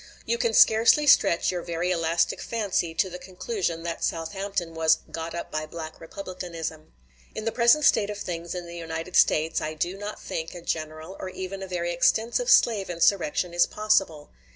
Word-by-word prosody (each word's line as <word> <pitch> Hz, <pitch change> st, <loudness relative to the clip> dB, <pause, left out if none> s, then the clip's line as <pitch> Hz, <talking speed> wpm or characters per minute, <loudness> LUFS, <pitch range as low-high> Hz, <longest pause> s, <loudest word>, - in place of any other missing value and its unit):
You 235 Hz, +1 st, -1 dB
can 230 Hz, -3 st, +1 dB
scarcely 230 Hz, +7 st, +6 dB
stretch 175 Hz, -12 st, +4 dB
your 180 Hz, -1 st, -3 dB
very 170 Hz, +1 st, -2 dB
elastic 170 Hz, -1 st, 0 dB
fancy 195 Hz, -7 st, -2 dB
to 190 Hz, -, +2 dB
the 180 Hz, 0 st, -8 dB
conclusion 180 Hz, -3 st, -4 dB
that 170 Hz, -1 st, -4 dB
Southampton 175 Hz, +1 st, -3 dB
was 160 Hz, 0 st, +3 dB
"got 165 Hz, 0 st, -5 dB
up 170 Hz, -, -6 dB
by 155 Hz, 0 st, -3 dB
Black 160 Hz, 0 st, -8 dB
Republicanism." 165 Hz, -3 st, -7 dB, 0.4 s
In 215 Hz, -, -5 dB
the 225 Hz, -, 0 dB
present 240 Hz, +6 st, +4 dB
state 210 Hz, -2 st, +4 dB
of 210 Hz, -, -4 dB
things 170 Hz, -3 st, -5 dB
in 175 Hz, -1 st, -5 dB
the 170 Hz, 0 st, -9 dB
United 165 Hz, +1 st, -6 dB
States, 160 Hz, +1 st, +3 dB
I 155 Hz, 0 st, -4 dB
do 175 Hz, +4 st, -2 dB
not 205 Hz, +1 st, -6 dB
think 160 Hz, +2 st, -5 dB
a 175 Hz, -, -8 dB
general 155 Hz, +2 st, -4 dB
or 185 Hz, -, -5 dB
even 190 Hz, +1 st, -6 dB
a 190 Hz, -, -5 dB
very 175 Hz, -1 st, -2 dB
extensive 230 Hz, -, +1 dB
slave 210 Hz, -, +4 dB
insurrection 175 Hz, 0 st, +1 dB
is 175 Hz, -, +4 dB
possible. 195 Hz, -8 st, 0 dB
175 Hz, 180 wpm, -26 LUFS, 165-200 Hz, 0.4 s, scarcely